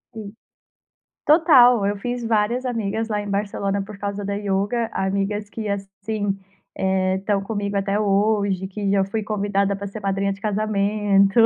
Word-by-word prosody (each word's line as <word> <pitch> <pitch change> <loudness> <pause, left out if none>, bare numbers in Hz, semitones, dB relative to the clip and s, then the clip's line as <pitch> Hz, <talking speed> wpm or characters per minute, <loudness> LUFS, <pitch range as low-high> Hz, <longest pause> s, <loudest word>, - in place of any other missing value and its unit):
Hum. 210 -2 -7 0.9
Total! 255 - +6
Eu 205 0 0
fiz 245 +3 -3
várias 230 +3 +1
amigas 225 -2 -2
lá 210 -2 -1
em 205 - -6
Barcelona, 200 0 -1
por 200 0 -10
causa 200 0 -4
da 200 0 -2
yoga. 205 +3 -1
Amigas 200 +2 -1
que, 220 -1 -5
assim, 200 +1 -3 0.4
eh, 190 0 +1
estão 195 +1 0
comigo 205 -1 -3
até 200 +1 0
hoje, 200 -2 +1
que 200 +1 -3
já 195 -1 +3
fui 210 +3 -3
convidada 200 -1 0
pra 200 +1 -6
ser 200 +2 -7
madrinha 195 0 0
de 195 - -9
casamento, 205 -1 +2
200 Hz, 155 wpm, -22 LUFS, 195-215 Hz, 0.9 s, Total